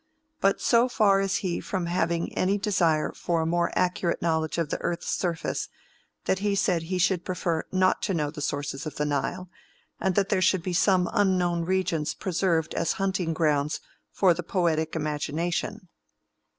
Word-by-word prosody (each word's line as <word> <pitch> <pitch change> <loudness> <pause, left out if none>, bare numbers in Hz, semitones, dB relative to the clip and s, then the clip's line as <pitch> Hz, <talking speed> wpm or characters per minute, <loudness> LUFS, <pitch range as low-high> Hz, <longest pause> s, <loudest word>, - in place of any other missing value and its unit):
But 195 0 +2
so 240 +1 +3
far 205 -5 +4
is 195 -1 0
he 175 -2 -1
from 185 -3 -3
having 170 -1 -1
any 195 +2 +2
desire 170 -7 +1
for 170 -2 -1
a - - -1
more 170 +1 +1
accurate 180 -1 +1
knowledge 160 -1 0
of 165 -3 -1
the - - -2
earth's 170 - -2
surface, 170 -3 -2 0.6
that 190 - +1
he 205 0 0
said 180 -3 +1
he 180 +3 -3
should 180 -1 +2
prefer 170 -3 -2
not 185 0 +2
to 195 - -1
know 150 -3 -1
the 150 - -8
sources 145 0 -3
of 155 - -7
the 150 - -1
Nile, 150 +6 -2 0.5
and 190 -2 0
that 195 0 +2
there 190 -3 +2
should 185 -1 +3
be 185 - -2
some 180 0 +3
unknown 180 -5 +2
regions 170 -4 0
preserved 170 -3 0
as 165 - 0
hunting 190 -3 -1
grounds 150 -2 +1 0.3
for 185 -3 +4
the 175 - -4
poetic 165 -3 0
imagination." 165 +6 -2
175 Hz, 175 wpm, -26 LUFS, 160-190 Hz, 0.6 s, far